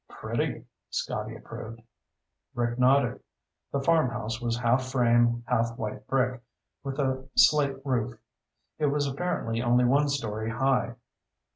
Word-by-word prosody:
"Pretty," -, -, -3 dB, 0.2 s
Scotty -, -, -3 dB
approved. 115 Hz, +1 st, -9 dB, 0.8 s
Rick 120 Hz, 0 st, -1 dB
nodded. 135 Hz, +2 st, +3 dB, 0.5 s
The 140 Hz, -, -1 dB
farmhouse 120 Hz, -8 st, +1 dB
was 120 Hz, -1 st, -1 dB
half 125 Hz, +2 st, +1 dB
frame, 120 Hz, -2 st, +3 dB
half 115 Hz, -2 st, 0 dB
white 110 Hz, -3 st, -5 dB
brick, 130 Hz, -2 st, 0 dB, 0.4 s
with 135 Hz, -1 st, -4 dB
a 130 Hz, -2 st, -1 dB
slate 140 Hz, -3 st, +5 dB
roof. 125 Hz, -3 st, -1 dB, 0.6 s
It 150 Hz, -, +2 dB
was 145 Hz, 0 st, +1 dB
apparently 135 Hz, -6 st, -2 dB
only 120 Hz, +1 st, +3 dB
one 140 Hz, +4 st, +3 dB
story 110 Hz, -6 st, -2 dB
high. 120 Hz, -1 st, +1 dB
125 Hz, 125 wpm, -27 LUFS, 120-135 Hz, 0.8 s, slate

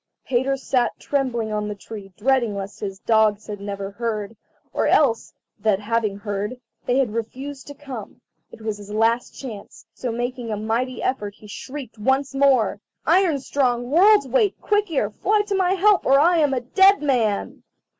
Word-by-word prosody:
Peter 265 Hz, +2 st, +1 dB
sat 255 Hz, -2 st, 0 dB
trembling 245 Hz, -6 st, -1 dB
on 210 Hz, 0 st, -1 dB
the 210 Hz, -, -4 dB
tree 200 Hz, -1 st, -10 dB
dreading 240 Hz, -2 st, +1 dB
lest 200 Hz, +1 st, -6 dB
his 195 Hz, -2 st, -5 dB
dogs 215 Hz, 0 st, +2 dB
had 205 Hz, -1 st, -7 dB
never 200 Hz, -1 st, -5 dB
heard, 215 Hz, -1 st, -3 dB, 0.4 s
or -, -, +1 dB
else 240 Hz, -7 st, +3 dB, 0.3 s
that, 205 Hz, -2 st, +2 dB
having 215 Hz, -1 st, -1 dB
heard, 205 Hz, +4 st, -4 dB, 0.3 s
they 245 Hz, -, +2 dB
had 255 Hz, -6 st, +1 dB
refused 265 Hz, +5 st, -5 dB
to 285 Hz, -, -9 dB
come. 265 Hz, -7 st, -9 dB, 0.3 s
It -, -, -13 dB
was 215 Hz, -1 st, -3 dB
his 205 Hz, 0 st, -10 dB
last 225 Hz, +3 st, 0 dB
chance, 225 Hz, -7 st, -9 dB
so 245 Hz, +2 st, -4 dB
making 245 Hz, 0 st, -3 dB
a 215 Hz, -, -2 dB
mighty 230 Hz, +4 st, -2 dB
effort 210 Hz, -6 st, -2 dB
he -, -, -17 dB
shrieked 250 Hz, +2 st, -8 dB
once 265 Hz, +5 st, +1 dB
more: 265 Hz, -7 st, +3 dB, 0.3 s
"Iron 340 Hz, -1 st, +3 dB
strong, 250 Hz, -2 st, 0 dB
World's 385 Hz, 0 st, +5 dB
weight, 315 Hz, -, +1 dB
Quick 415 Hz, -1 st, +1 dB
ear, 240 Hz, -10 st, 0 dB
fly 415 Hz, -, +1 dB
to 410 Hz, -, -3 dB
my 375 Hz, -1 st, +2 dB
help, 395 Hz, +1 st, +4 dB
or 275 Hz, +1 st, +5 dB
I 340 Hz, +4 st, +4 dB
am 290 Hz, -4 st, +2 dB
a 250 Hz, -, -1 dB
dead 385 Hz, +8 st, +4 dB
man!" 230 Hz, -8 st, 0 dB
240 Hz, 175 wpm, -22 LUFS, 210-275 Hz, 0.4 s, World's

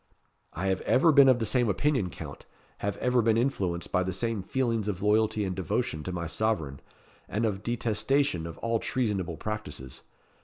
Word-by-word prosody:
"I 90 Hz, -, -3 dB
have 95 Hz, -, 0 dB
ever 160 Hz, +6 st, +4 dB
been 140 Hz, -2 st, +7 dB
of 130 Hz, -, +5 dB
the 115 Hz, -, -1 dB
same 120 Hz, -1 st, +2 dB
opinion, 130 Hz, -3 st, +1 dB
Count; 75 Hz, -4 st, -9 dB, 0.3 s
have 100 Hz, 0 st, -2 dB
ever 125 Hz, -1 st, +2 dB
been 110 Hz, 0 st, +3 dB
influenced 95 Hz, -9 st, -1 dB
by 90 Hz, -, +2 dB
the 95 Hz, 0 st, -1 dB
same 110 Hz, +2 st, -1 dB
feelings 115 Hz, 0 st, -1 dB
of 95 Hz, -2 st, -3 dB
loyalty 105 Hz, 0 st, +2 dB
and 95 Hz, -1 st, -3 dB
devotion 80 Hz, -3 st, -1 dB
to 90 Hz, -, -3 dB
my 85 Hz, -1 st, -3 dB
sovereign, 80 Hz, -7 st, -1 dB, 0.5 s
and 110 Hz, +3 st, 0 dB
of 100 Hz, -3 st, -1 dB
detestation 120 Hz, -, 0 dB
of 80 Hz, -, -8 dB
all 115 Hz, 0 st, 0 dB
treasonable 105 Hz, -, -1 dB
practices. 75 Hz, -, -6 dB
105 Hz, 180 wpm, -28 LUFS, 90-120 Hz, 0.5 s, been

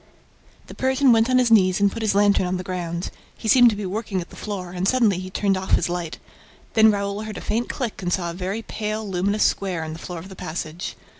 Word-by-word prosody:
The -, -, -11 dB
Persian 265 Hz, 0 st, +3 dB
went 225 Hz, +1 st, +4 dB
on 255 Hz, -, +4 dB
his 245 Hz, -2 st, +3 dB
knees 185 Hz, -4 st, +5 dB
and 200 Hz, 0 st, +3 dB
put 230 Hz, -, -6 dB
his 215 Hz, -3 st, +1 dB
lantern 200 Hz, -2 st, +3 dB
on 180 Hz, +1 st, -1 dB
the 180 Hz, -, -5 dB
ground. 175 Hz, -1 st, -4 dB, 0.3 s
He -, -, -6 dB
seemed 245 Hz, +2 st, +7 dB
to 215 Hz, -, -2 dB
be 205 Hz, -1 st, -4 dB
working 200 Hz, 0 st, -3 dB
at 175 Hz, -, -7 dB
the -, -, -12 dB
floor; 190 Hz, -4 st, -5 dB
and 180 Hz, +1 st, -2 dB
suddenly 225 Hz, -7 st, +3 dB
he 185 Hz, 0 st, -6 dB
turned 195 Hz, +1 st, +1 dB
off 190 Hz, 0 st, -3 dB
his 175 Hz, -, 0 dB
light. 175 Hz, -2 st, -4 dB, 0.6 s
Then 220 Hz, 0 st, +6 dB
Raoul 200 Hz, 0 st, -1 dB
heard 215 Hz, -1 st, -6 dB
a -, -, -6 dB
faint 230 Hz, +3 st, -2 dB
click 235 Hz, -6 st, -4 dB
and 175 Hz, -1 st, -2 dB
saw 175 Hz, -2 st, -1 dB
a -, -, -8 dB
very 190 Hz, +5 st, -4 dB
pale 215 Hz, 0 st, -4 dB
luminous 200 Hz, +3 st, 0 dB
square 185 Hz, -5 st, 0 dB
in 155 Hz, 0 st, -5 dB
the 160 Hz, -, -8 dB
floor 175 Hz, +1 st, -7 dB
of 175 Hz, +4 st, -9 dB
the 190 Hz, -, -10 dB
passage. 170 Hz, -1 st, -5 dB
200 Hz, 250 wpm, -23 LUFS, 180-220 Hz, 0.6 s, seemed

